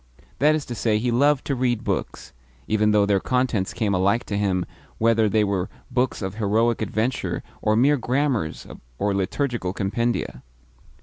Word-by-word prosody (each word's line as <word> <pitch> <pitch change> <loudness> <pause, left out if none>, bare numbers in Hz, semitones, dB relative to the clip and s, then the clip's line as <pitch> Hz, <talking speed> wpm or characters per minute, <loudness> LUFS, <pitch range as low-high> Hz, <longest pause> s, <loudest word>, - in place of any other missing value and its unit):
That 150 +3 +4
is 155 - -3
to 120 - -6
say, 110 -2 +1
he 120 +3 0
loved 140 +3 +3
to 140 - -1
read 120 -3 0
books, - - -4 0.3
even 105 0 +2
though 105 -1 +4
their 100 -1 +2
contents 125 -5 0
came 105 -4 -1
alike 100 +5 +2
to 105 - -4
him 95 -3 0 0.3
whether 115 -1 +3
they 105 +2 +3
were 100 -3 -1 0.2
books 125 -3 0
of 95 0 -3
heroic 115 +2 +1
adventure 110 +4 -2 0.2
or 110 - +2
mere 140 +6 +4
grammars 125 - -1 0.3
or 100 +7 0
liturgical 100 0 -2
compendia. 115 +4 -2
110 Hz, 165 wpm, -23 LUFS, 100-125 Hz, 0.3 s, That